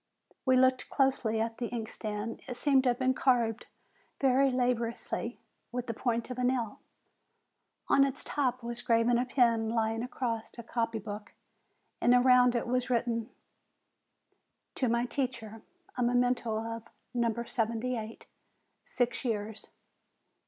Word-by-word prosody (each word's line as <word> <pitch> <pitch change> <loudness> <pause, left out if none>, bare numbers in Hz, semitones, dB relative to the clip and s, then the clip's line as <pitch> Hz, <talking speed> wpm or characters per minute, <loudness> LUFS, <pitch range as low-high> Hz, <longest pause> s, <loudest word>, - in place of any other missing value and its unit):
We 260 0 +5
looked 255 0 +3
closely 260 -5 +1
at 225 0 -2
the 240 - -1
inkstand: 220 -1 -4
it 250 - -4
seemed 275 0 +4
to - - +5
have 240 - +1
been 260 0 +2
carved 240 -4 +1 0.5
very 270 0 +4
laboriously 245 -2 -1 0.3
with 245 0 -3
the 230 - -3
point 235 +1 -1
of 250 - -5
a - - 0
nail. 245 -4 0 1.1
On 275 - +5
its 275 -1 -2
top 255 -4 -1
was 235 0 -5
graven 235 +1 +3
a 250 - -1
pen 230 -3 +3
lying 225 0 0
across 240 -2 -3
a 235 - -7
copy 230 -1 -1
book, 210 0 -7 0.7
and 245 +1 +5
around 250 0 +5
it 235 - 0
was 250 +1 0
written: 235 -1 0 1.4
"To 255 - 0
my 235 +1 +2
teacher. 245 -5 -4 0.3
A 250 - -2
memento 245 -1 +2
of 230 0 -5 0.3
No. 235 -1 +2
78. 230 -1 -3 0.6
Six 245 +1 -1
years!' 220 -3 -3
240 Hz, 140 wpm, -30 LUFS, 225-250 Hz, 1.4 s, We